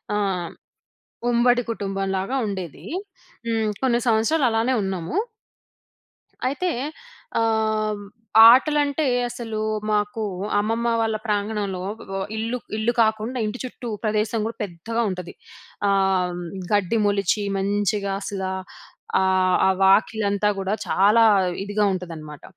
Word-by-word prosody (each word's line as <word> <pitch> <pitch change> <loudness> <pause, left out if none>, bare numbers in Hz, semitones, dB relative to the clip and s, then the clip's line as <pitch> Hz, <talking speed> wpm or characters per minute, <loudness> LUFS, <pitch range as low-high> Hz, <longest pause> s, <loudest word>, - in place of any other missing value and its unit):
ఆ! - - +1 1.1
ఉమ్మడి 245 +1 +3
కుటుంబంలాగా 195 +1 -2
ఉండేది. 185 -5 -6 0.6
హ్మ్, 225 -1 +1
కొన్ని 240 -2 +3
సంవత్సరాలు 235 +6 +3
అలానే 225 +3 +1
ఉన్నాము. 190 - -3 1.3
అయితే, 290 +7 -1 0.7
ఆహ్, 220 -2 0 0.5
ఆటలంటే 290 +3 +3 0.2
అసలు 225 -3 -5 0.3
మాకు 210 +1 0 0.4
అమ్మమ్మ 225 +3 0
వాళ్ళ 220 -1 0
ప్రాంగణంలో 205 -3 -1 0.3
వ 195 - -2 0.2
ఇల్లు 230 +3 -2 0.2
ఇల్లు 225 +2 +1
కాకుండా 220 +3 0
ఇంటి 215 +4 -4
చుట్టూ 250 -1 -8 0.2
ప్రదేశం 215 +1 0
కూడా 230 - -7
పెద్దగా 205 +6 -3
ఉంటది. 180 -2 -6 0.6
ఆహ్, 190 -2 +1 0.3
గడ్డి 205 +2 +2
మొలిచి 205 +1 +1
మంచిగా 200 0 0
అసల 195 -1 -4 0.8
ఆహ్, 185 -1 +3
ఆ - - +5
వాకిలంతా 205 +1 +3
గూడా 195 +1 -1
చాలా 210 +4 +4 0.4
ఇదిగా 205 +1 0
ఉంటాదనమాట. 160 -5 -7
210 Hz, 105 wpm, -23 LUFS, 195-230 Hz, 1.3 s, ఆ